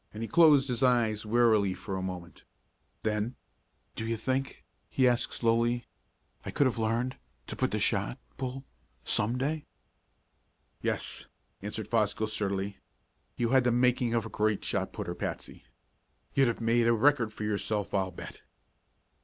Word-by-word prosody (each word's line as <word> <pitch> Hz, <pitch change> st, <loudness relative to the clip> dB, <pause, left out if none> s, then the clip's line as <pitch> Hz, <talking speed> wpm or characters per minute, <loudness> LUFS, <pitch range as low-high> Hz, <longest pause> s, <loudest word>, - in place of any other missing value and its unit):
He 110 Hz, +2 st, -5 dB
closed 150 Hz, -4 st, +6 dB
his 125 Hz, -3 st, -2 dB
eyes 115 Hz, -4 st, +2 dB
wearily 110 Hz, -4 st, +3 dB
for 95 Hz, +1 st, -5 dB
a 95 Hz, -, -2 dB
moment. 90 Hz, -2 st, -6 dB, 0.6 s
Then, 110 Hz, +3 st, -1 dB, 0.6 s
"Do -, -, -4 dB
you 115 Hz, 0 st, -1 dB
think," 130 Hz, +4 st, -2 dB, 0.2 s
he 130 Hz, -1 st, +3 dB
asked 120 Hz, -1 st, +1 dB
slowly, 120 Hz, +1 st, +1 dB, 0.6 s
"I -, -, -5 dB
could 145 Hz, -, +2 dB
have 125 Hz, -3 st, 0 dB
learned 115 Hz, +4 st, 0 dB, 0.3 s
to -, -, -6 dB
put -, -, +1 dB
the -, -, -1 dB
shot, -, -, +1 dB, 0.2 s
Bull 130 Hz, +1 st, -4 dB, 0.4 s
some 110 Hz, -, +1 dB
day?" 150 Hz, +4 st, -2 dB, 1.1 s
"Yes," -, -, -2 dB, 0.3 s
answered -, -, -4 dB
Fosgill 110 Hz, -, +1 dB
sturdily. 100 Hz, -2 st, -2 dB, 0.6 s
"You 120 Hz, -1 st, +1 dB
had 130 Hz, 0 st, +5 dB
the 120 Hz, -, +3 dB
making 120 Hz, -1 st, +2 dB
of 115 Hz, -1 st, +1 dB
a -, -, -6 dB
great 105 Hz, -1 st, 0 dB
shot -, -, -1 dB
putter, 85 Hz, -, -4 dB
Patsy. -, -, -6 dB, 0.7 s
You'd 135 Hz, -2 st, +4 dB
have 115 Hz, 0 st, -1 dB
made 115 Hz, +1 st, +3 dB
a 115 Hz, -, +5 dB
record 120 Hz, -1 st, +3 dB
for 110 Hz, -, -7 dB
yourself, 105 Hz, -1 st, -1 dB
I'll 95 Hz, -2 st, +1 dB
bet!" 90 Hz, -, -10 dB
115 Hz, 155 wpm, -30 LUFS, 105-125 Hz, 1.1 s, closed